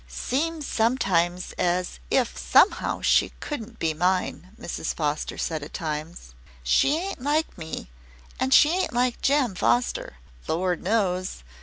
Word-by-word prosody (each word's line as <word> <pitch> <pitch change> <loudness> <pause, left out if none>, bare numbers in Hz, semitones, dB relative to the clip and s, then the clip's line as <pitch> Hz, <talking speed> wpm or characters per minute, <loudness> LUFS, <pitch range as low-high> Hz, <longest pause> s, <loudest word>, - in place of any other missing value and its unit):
"Seems 295 - -2
sometimes 180 -8 +1
as 180 +1 0
if 255 -3 +1
somehow 405 - +3
she - - +3
couldn't 250 -8 -6
be 160 -1 0
mine," 180 +2 0
Mrs. - - -4
Foster 150 -1 -2
said 160 -2 -2
at 145 - -9
times. 155 - -5 0.3
"She 65 - +3
ain't 380 -4 -4
like 300 +4 0
me, 160 - -7 0.5
an' 260 - +1
she 295 +3 +6
ain't 370 -5 0
like 245 0 0
Jem 275 -6 +2
Foster, 120 - 0 0.3
Lord 180 +1 0
knows. 185 - -1
185 Hz, 135 wpm, -25 LUFS, 160-265 Hz, 0.5 s, she